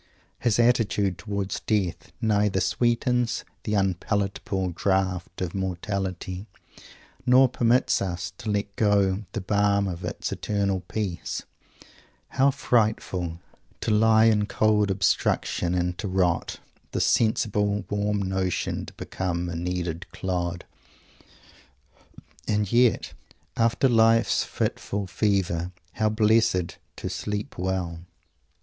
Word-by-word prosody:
His 115 -3 +2
attitude 105 -6 +2
towards 100 0 -3
death 100 -6 -1
neither 105 -3 +2
sweetens 120 +2 +1 0.2
"the 105 - 0
unpalatable 95 0 -1
draught 95 0 -1
of 90 -2 -2
mortality" 95 0 -3 0.8
nor 130 +1 +6
permits 120 0 +2
us 90 -1 -3
to 110 - -5
let 100 -1 -1
go 100 -1 +2
the 110 - -2
balm 100 0 +2
of 90 -1 -5
its - - -4
"eternal 100 -2 -1
peace." 90 0 -4 0.9
How 135 +2 +3
frightful 105 -10 0 0.4
"to - - 0
lie 110 +1 +5
in 105 -2 +3
cold 105 -2 +2
obstruction 95 -2 +1
and 90 0 0
to 105 - -3
rot; 90 -3 0 0.3
this - - +1
sensible 105 -2 +1
warm 105 -1 -1
motion 95 -1 -1
to - - -10
become 90 -2 -3
a 85 - -4
kneaded 85 0 -3
clod!" 90 -2 -3 1.8
and 105 -2 0
yet, 120 0 +3 0.4
"after 115 +3 +3
life's 115 -1 +4
fitful 100 0 -2
fever," 90 -3 0 0.2
how 110 +2 +1
blessed 110 -5 +2 0.2
to - - -5
"sleep 105 -3 -4
well!" 90 -2 -2
100 Hz, 110 wpm, -26 LUFS, 90-110 Hz, 1.8 s, nor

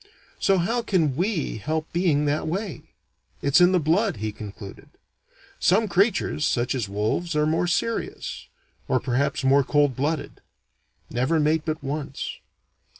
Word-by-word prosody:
"So 195 - +3
how 225 +8 0
can 170 - +1
we 175 - -1
help 155 +6 -3
being 165 -4 +2
that 150 +2 0
way? 185 - -3 0.6
It's 140 +5 +4
in 175 +1 +6
the 185 - +3
blood," 175 +6 +1
he 110 0 -3
concluded. 105 -1 -10 0.7
"Some 215 +5 +3
creatures, 195 -5 +1
such 125 -4 +1
as 120 -7 -2
wolves, 110 - -1
are 150 0 +3
more 160 +3 +1
serious; 230 +6 -2 0.4
or - - +2
perhaps 140 +3 -1
more 135 +1 +5
cold 145 -1 +2
blooded. 150 +4 -2 0.7
Never 130 +7 +1
mate 155 +1 +1
but 155 -1 -3
once. 140 0 -4
155 Hz, 145 wpm, -24 LUFS, 135-175 Hz, 0.7 s, in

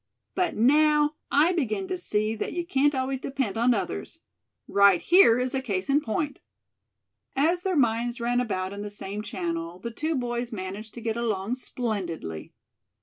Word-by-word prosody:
But 365 -2 0
now 300 +5 +4 0.2
I 310 +6 +4
begin 330 - -1
to 370 - -1
see 215 -11 -1
that 220 - -4
you 345 -1 -2
can't 290 -3 +2
always 260 0 -1
depend 265 -7 -2
on 235 +2 +3
others. 80 - -4 0.5
Right 200 -3 +5
here 345 -10 +6
is 250 0 -1
a 265 - 0
case 195 -5 -3
in 290 +2 +4
point." 285 +4 -2 1.0
As 330 +6 +2
their 375 0 -1
minds 240 -1 +1
ran 240 +1 +1
about 190 -5 -2
in 200 - -6
the 205 - -5
same 205 0 -6
channel 170 -4 -4
the 235 +6 -6
two 310 +7 -2
boys 240 -1 -2
managed 205 +1 -6
to 235 - -7
get 225 0 -2
along 220 -2 -1
splendidly. 190 - -4
235 Hz, 170 wpm, -26 LUFS, 205-280 Hz, 1.0 s, here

